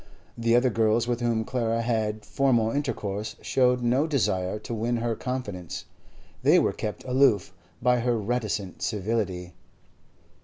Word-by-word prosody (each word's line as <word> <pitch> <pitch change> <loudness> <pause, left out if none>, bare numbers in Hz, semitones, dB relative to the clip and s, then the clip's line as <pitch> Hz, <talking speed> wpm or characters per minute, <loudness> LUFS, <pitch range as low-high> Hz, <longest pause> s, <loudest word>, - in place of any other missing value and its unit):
The 115 0 +2
other 125 +1 +4
girls 115 +1 +2
with 120 -1 0
whom 115 -2 0
Clara 115 -2 0
had 110 -2 -1
formal 120 -3 +2
intercourse 110 -7 -3
showed 125 -1 +2
no 130 +6 +2
desire 95 - 0
to 110 +2 -7
win 115 +2 0
her 115 0 -1
confidence; 105 -10 -5 0.6
they - - +5
were - - +2
kept 105 - -5
aloof 125 -8 +3 0.3
by 125 0 +4
her 120 0 +1
reticent 105 -3 -2
civility. 95 -4 -2
115 Hz, 140 wpm, -26 LUFS, 105-125 Hz, 0.6 s, they